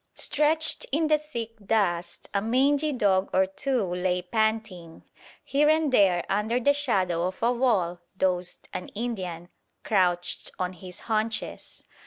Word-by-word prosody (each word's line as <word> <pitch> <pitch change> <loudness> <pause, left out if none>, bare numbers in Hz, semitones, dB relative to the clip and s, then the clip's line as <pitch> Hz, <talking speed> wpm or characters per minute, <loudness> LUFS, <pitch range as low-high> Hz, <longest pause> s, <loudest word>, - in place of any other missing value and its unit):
Stretched 315 +2 +1
in 310 +2 +1
the 305 -1 +4
thick 235 -7 -6
dust 175 -6 0
a 200 - +1
mangy 275 +7 +2
dog 200 -7 +2
or 190 0 +4
two 245 +5 -1
lay 180 0 -1
panting; 220 -4 -2 0.4
here 295 +2 +2
and 310 -2 +3
there 190 -7 +4
under 215 +5 0
the 285 +4 +3
shadow 185 -12 0
of 185 +4 -7
a 235 - +4
wall 210 -9 +1 0.2
dozed 180 -2 -1
an 180 - -5
Indian, 185 -7 -4 0.3
crouched 180 -4 0
on 185 0 -2
his 180 0 -10
haunches. 220 0 -3
210 Hz, 140 wpm, -26 LUFS, 180-255 Hz, 0.4 s, the